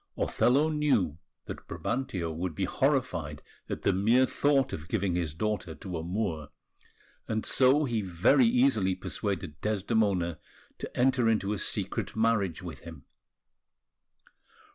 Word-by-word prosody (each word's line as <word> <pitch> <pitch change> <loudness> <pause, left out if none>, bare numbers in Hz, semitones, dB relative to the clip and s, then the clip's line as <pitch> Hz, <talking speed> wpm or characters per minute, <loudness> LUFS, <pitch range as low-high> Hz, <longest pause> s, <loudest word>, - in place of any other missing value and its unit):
Othello 140 +6 +2
knew 125 - +1 0.3
that - - -8
Brabantio 110 -10 -3
would 85 0 -4
be 95 - -1
horrified 90 - -1 0.3
at - - -4
the - - +3
mere 115 +7 +4
thought 135 -1 +1
of 80 +1 -6
giving 100 -2 -1
his 85 -4 -2
daughter 105 -4 -2
to 90 -3 -7
a 80 - -3
Moor; 85 -3 -3 0.8
and 110 0 -2
so 135 +3 +4
he 115 -4 -1
very 95 +8 +3
easily 115 -6 +2
persuaded 90 -5 -4
Desdemona 100 -5 0 0.4
to - - -7
enter 125 -2 +3
into 105 -2 +1
a 105 - -3
secret - - -2
marriage 110 -7 +1
with 85 -3 -7
him. 80 -5 -11
105 Hz, 135 wpm, -29 LUFS, 85-125 Hz, 0.8 s, mere